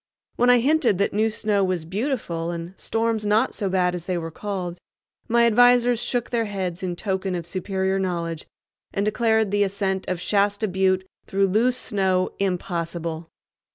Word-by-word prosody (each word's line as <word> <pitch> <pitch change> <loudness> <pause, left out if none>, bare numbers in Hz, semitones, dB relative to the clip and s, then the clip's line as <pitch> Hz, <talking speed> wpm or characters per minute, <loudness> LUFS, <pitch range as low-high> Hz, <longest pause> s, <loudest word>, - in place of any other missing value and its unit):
When 245 +1 +3
I 245 - +7
hinted 270 - +3
that 200 - 0
new 215 +2 +2
snow 210 -2 0
was 185 -4 -1
beautiful 185 - -2
and 170 +1 -5
storms 225 0 -1
not 215 +4 +2
so 200 -3 -2
bad 180 -1 +2
as 175 -2 -6
they 180 -2 0
were 165 -1 -4
called, 180 -2 -4 0.5
my 235 0 +4
advisers 245 +1 +5
shook 245 -1 -2
their 230 -2 +1
heads 190 -4 -4
in 180 -2 -2
token 190 -1 -2
of 170 -2 -4
superior 190 +2 -1
knowledge 170 -4 -3 0.4
and 200 - -1
declared 220 -1 +2
the 205 0 +2
ascent 195 -1 -2
of 185 -2 -2
"Shasta 205 +3 +1
Butte" 190 0 +1 0.2
through 195 0 +1
loose 240 +6 +2
snow 190 -6 0
impossible. 170 -3 -3
195 Hz, 165 wpm, -24 LUFS, 180-220 Hz, 0.5 s, I